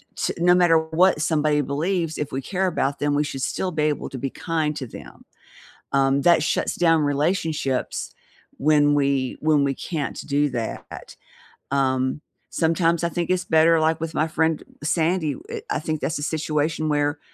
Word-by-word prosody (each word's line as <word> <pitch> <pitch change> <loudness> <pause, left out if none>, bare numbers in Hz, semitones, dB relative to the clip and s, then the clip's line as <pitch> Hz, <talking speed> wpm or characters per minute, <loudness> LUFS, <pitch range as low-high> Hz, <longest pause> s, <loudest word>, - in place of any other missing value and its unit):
t - - -1
no 180 +1 +4
matter 175 -2 +5
what 160 +1 +2
somebody 150 -2 +2
believes, 160 +4 -1
if 150 - -4
we 135 - -3
care 190 +6 -1
about 140 -5 -1
them, 145 0 0
we 150 - +2
should 135 -2 -5
still 185 -1 -2
be 155 -2 -1
able 150 -1 -1
to 135 - -7
be 135 - -2
kind 160 -3 -2
to 130 - -5
them. - - -12 0.7
Um, 135 0 +2
that 170 -3 +5
shuts 160 - -1
down 165 -2 +3
relationships 145 -2 -1 0.4
when 145 0 +4
we 140 -2 0
when 150 -2 +3
we 135 -1 0
can't 150 -2 -4
do 145 0 +1
that. 120 -3 -6 0.5
Um, 130 0 0 0.3
sometimes 165 0 +1
I 170 - +2
think 175 +1 -3
it's 185 0 +1
better, 165 0 +4
like, 160 0 +1
with 165 -1 -3
my 155 - +1
friend 160 0 0 0.2
Sandy, 160 0 0
eh, 460 -2 -4
I - - 0
think 155 -1 -3
that's 160 - -2
a 145 - -6
situation 155 0 -1
where 145 0 0
155 Hz, 175 wpm, -23 LUFS, 145-165 Hz, 0.7 s, matter